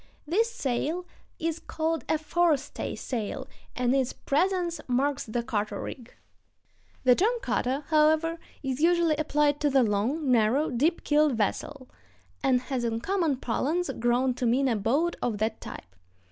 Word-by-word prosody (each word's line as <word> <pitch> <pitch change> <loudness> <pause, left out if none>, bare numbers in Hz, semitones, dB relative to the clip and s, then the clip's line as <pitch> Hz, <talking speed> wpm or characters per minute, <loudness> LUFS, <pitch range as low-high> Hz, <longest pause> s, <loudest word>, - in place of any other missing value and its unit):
This 420 +10 +2
sail 310 - -2 0.3
is 330 0 -2
called 320 0 -2
a 315 - +3
forestay 315 -2 0
sail, 225 -5 -4 0.3
and 250 0 +1
its 260 -2 +1
presence 350 +3 0
marks 270 +3 0
the 235 +2 -2
cutter 210 -3 -2
rig. 245 -3 -7 0.9
The 255 -1 +6
term 415 - +2
"cutter," 265 +4 -1
however, 315 +1 +3 0.2
is 265 +1 -2
usually 340 -1 +4
applied 295 -1 +1
to 295 - +2
the 265 -2 +4
long, 240 +8 0
narrow, 245 +6 +3
deep 295 +8 +1
keeled 300 -1 +3
vessel, 255 +5 -2 0.5
and 255 -2 +3
has 255 -1 -3
in 225 -1 -1
common 340 -7 0
parlance 300 +9 -1
grown 245 +2 +1
to 245 0 -1
mean 265 +4 +2
a 240 - +2
boat 275 +12 +1
of 230 -4 -1
that 220 +1 -2
type. 95 0 -9
275 Hz, 150 wpm, -27 LUFS, 245-320 Hz, 0.9 s, The